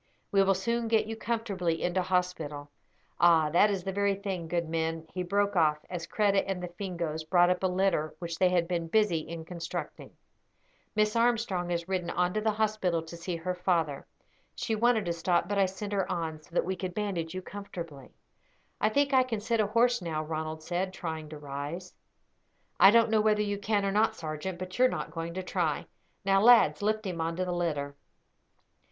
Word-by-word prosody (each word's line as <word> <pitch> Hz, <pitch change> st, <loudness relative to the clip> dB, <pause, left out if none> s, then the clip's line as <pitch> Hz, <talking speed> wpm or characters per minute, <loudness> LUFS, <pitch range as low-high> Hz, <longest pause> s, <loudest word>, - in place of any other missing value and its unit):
We 195 Hz, -, +4 dB
will 195 Hz, 0 st, +3 dB
soon 235 Hz, +5 st, -1 dB
get 225 Hz, -1 st, +3 dB
you 225 Hz, +1 st, -5 dB
comfortably 205 Hz, -8 st, -2 dB
into 180 Hz, +1 st, +1 dB
hospital. 170 Hz, -6 st, -2 dB, 0.5 s
Ah, 165 Hz, -3 st, +5 dB
that 190 Hz, +6 st, +5 dB
is 195 Hz, -3 st, -2 dB
the 195 Hz, -, -2 dB
very 200 Hz, 0 st, +1 dB
thing; 190 Hz, -4 st, -4 dB
good 170 Hz, 0 st, -1 dB
men," 165 Hz, 0 st, -2 dB
he 185 Hz, -, -2 dB
broke 200 Hz, +3 st, 0 dB
off, 155 Hz, -3 st, +4 dB
as 170 Hz, -2 st, -4 dB
Kreta 200 Hz, -1 st, +2 dB
and 190 Hz, -2 st, -3 dB
the 180 Hz, -, -4 dB
Fingoes 170 Hz, -4 st, -4 dB
brought 175 Hz, +2 st, +4 dB
up 180 Hz, -, -1 dB
a 190 Hz, -, +2 dB
litter 180 Hz, -4 st, 0 dB
which 170 Hz, -1 st, -5 dB
they 185 Hz, -, +5 dB
had 175 Hz, -2 st, +1 dB
been 170 Hz, -2 st, -2 dB
busy 205 Hz, -2 st, +2 dB
in 160 Hz, +1 st, -7 dB
constructing. 170 Hz, 0 st, -6 dB, 0.9 s
"Miss 215 Hz, +1 st, +2 dB
Armstrong 230 Hz, -7 st, +1 dB
has 170 Hz, 0 st, -2 dB
ridden 185 Hz, -2 st, -2 dB
on 180 Hz, 0 st, 0 dB
to 215 Hz, -, 0 dB
the 220 Hz, -, +1 dB
hospital 210 Hz, -6 st, 0 dB
to 165 Hz, +1 st, -9 dB
see 170 Hz, +1 st, -4 dB
her 175 Hz, +2 st, -3 dB
father. 170 Hz, -6 st, -1 dB, 0.5 s
She 225 Hz, -, -2 dB
wanted 225 Hz, -1 st, +2 dB
to 170 Hz, -, 0 dB
stop, 170 Hz, +1 st, +1 dB
but 205 Hz, 0 st, 0 dB
I 195 Hz, -, +4 dB
sent 200 Hz, +2 st, -6 dB
her 195 Hz, -2 st, 0 dB
on, 160 Hz, -3 st, -3 dB
so -, -, -21 dB
that -, -, +2 dB
we 190 Hz, +1 st, -1 dB
could 180 Hz, -1 st, -5 dB
bandage 185 Hz, -5 st, -2 dB
you 185 Hz, -, -4 dB
comfortably." 170 Hz, -9 st, -8 dB, 0.7 s
"I 215 Hz, -, +3 dB
think 280 Hz, +4 st, +1 dB
I 260 Hz, -, +7 dB
can 245 Hz, -4 st, -2 dB
sit 225 Hz, +2 st, -1 dB
a 210 Hz, -, +3 dB
horse 235 Hz, +2 st, +3 dB
now," 160 Hz, -3 st, -2 dB
Ronald 155 Hz, 0 st, -4 dB
said, 185 Hz, +3 st, -2 dB
trying 160 Hz, -4 st, -5 dB
to 155 Hz, -, -8 dB
rise. 145 Hz, +5 st, -6 dB, 0.9 s
"I -, -, +9 dB
don't 230 Hz, +1 st, +5 dB
know 220 Hz, -1 st, +4 dB
whether 210 Hz, -1 st, +3 dB
you 205 Hz, -1 st, -2 dB
can 205 Hz, -1 st, 0 dB
or 195 Hz, -, +1 dB
not, 220 Hz, +2 st, +2 dB
sergeant; 160 Hz, +1 st, -5 dB
but 185 Hz, +4 st, -7 dB
you 255 Hz, -, +7 dB
are -, -, +5 dB
not -, -, -4 dB
going 165 Hz, 0 st, -5 dB
to 185 Hz, -, -3 dB
try. 175 Hz, -4 st, -1 dB, 0.4 s
Now, 195 Hz, 0 st, +4 dB
lads, 235 Hz, -1 st, +6 dB
lift 215 Hz, +1 st, 0 dB
him 175 Hz, -3 st, -3 dB
on 165 Hz, +1 st, -1 dB
to 185 Hz, +1 st, -1 dB
the 180 Hz, -, -2 dB
litter." 150 Hz, -5 st, -2 dB
180 Hz, 210 wpm, -29 LUFS, 165-205 Hz, 0.9 s, I